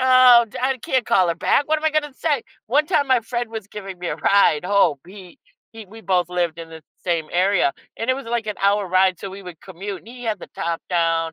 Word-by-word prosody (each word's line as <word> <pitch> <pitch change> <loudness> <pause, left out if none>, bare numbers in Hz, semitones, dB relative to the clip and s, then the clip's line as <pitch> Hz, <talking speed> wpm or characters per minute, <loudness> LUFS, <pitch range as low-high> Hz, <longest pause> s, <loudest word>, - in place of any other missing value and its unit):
"Oh, 255 -2 +7
d - - -9
I 260 0 0
can't 255 +1 -1
call 185 -2 +3
her 170 - 0
back. 280 - +1
What 310 0 +2
am 310 - -9
I 315 - +3
gonna 300 -2 -1
say?" 290 -6 -1 0.2
One 290 +7 +2
time 285 -2 +1
my 260 -2 +3
friend 240 +1 -4
was 220 -3 -6
giving 195 -3 -8
me 175 - -4
a - - -3
ride 190 -5 +3
home 185 -6 +3
he 185 -2 -13 0.3
he 225 -1 -10
We 220 +4 -13
both 180 -4 0
lived 175 -2 -2
in 165 -1 -9
the 160 -1 -11 0.2
same 170 -3 -1
area, 180 -4 +2 0.3
and 230 +3 -1
it - - +2
was 275 - -7
like 235 -1 -2
an 210 - -4
hour 200 0 +2
ride, 185 0 +3
so, 195 - -5
we 195 +1 -10
would 175 -3 -11
commute, 195 +1 -7
and - - -17
he 245 +1 -10
had 220 -2 -2
the - - -10
top 170 0 -3
down. 165 -2 +1
200 Hz, 255 wpm, -21 LUFS, 180-240 Hz, 0.3 s, Oh